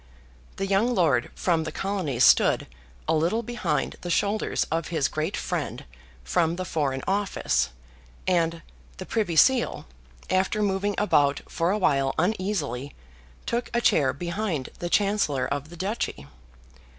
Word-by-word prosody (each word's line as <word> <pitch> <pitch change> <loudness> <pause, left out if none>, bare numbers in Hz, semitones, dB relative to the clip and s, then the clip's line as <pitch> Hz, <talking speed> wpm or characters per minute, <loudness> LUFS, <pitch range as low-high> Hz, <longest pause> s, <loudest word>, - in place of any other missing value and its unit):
The 195 - -2
young 205 +6 +2
lord 145 - +2
from 165 -3 +1
the 160 - -4
Colonies 180 -10 -1
stood - - +5 0.4
a - - +2
little 170 +9 +1
behind 210 - -2
the 175 - -5
shoulders 205 +4 +1
of 165 0 -1
his 155 -5 +1
great 155 +5 -2
friend - - -3 0.4
from 160 - +1
the 185 +1 -4
Foreign 140 -6 -1
Office; 195 - 0 0.6
and 170 -2 +1 0.3
the 185 - -6
Privy 205 -7 -1
Seal, 255 +7 +3 0.4
after 190 +3 +1
moving 200 0 0
about 145 -9 +3
for 165 +1 -1
a 205 - +2
while 135 -8 +2
uneasily, 160 - -1 0.5
took 235 +1 -2
a - - +4
chair 140 - +3
behind 170 -1 -3
the 175 -1 -3
Chancellor 200 -9 +2
of 145 +1 -3
the 175 - -11
Duchy. 190 - -3
175 Hz, 140 wpm, -26 LUFS, 150-200 Hz, 0.6 s, stood